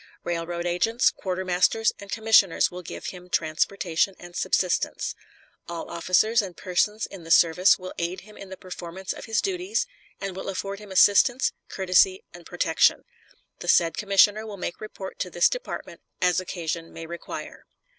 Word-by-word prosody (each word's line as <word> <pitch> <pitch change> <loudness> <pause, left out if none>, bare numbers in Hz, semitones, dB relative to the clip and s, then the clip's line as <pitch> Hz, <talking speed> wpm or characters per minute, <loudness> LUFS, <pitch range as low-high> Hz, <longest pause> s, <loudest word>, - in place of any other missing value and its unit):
Railroad 170 0 -3
agents, 225 +8 +2
quartermasters, 185 +4 +1
and 200 -1 -10
commissioners 220 -5 +4
will 180 +1 -7
give 175 - -8
him 180 0 -12
transportation 170 +3 0
and 175 0 -12
subsistence. 185 -1 0 0.6
All 170 -1 -6
officers 185 +7 +3
and 185 -4 -8
persons 210 +4 0
in 190 -4 -11
the 165 - -11
service 175 +3 +5
will 185 0 -8
aid 175 +2 -3
him 210 +2 -16
in 195 - -10
the 190 - -8
performance 185 +1 -6
of - - -9
his 225 -1 0
duties, 385 +4 -1 0.3
and 195 -2 -5
will 190 - -5
afford 195 +1 -4
him 210 -2 -12
assistance, 205 +7 +4 0.2
courtesy, 285 - +3
and - - -12
protection. - - +2 0.6
The - - -8
said 165 -1 +4
commissioner 205 +1 +4
will 215 -2 -8
make 180 - -5
report 200 -3 -8
to 180 - -2
this 175 0 +4
department - - -6 0.2
as 180 -1 +3
occasion 170 -2 -4
may 165 - -8
require. 170 +1 -8
185 Hz, 160 wpm, -25 LUFS, 175-210 Hz, 0.6 s, service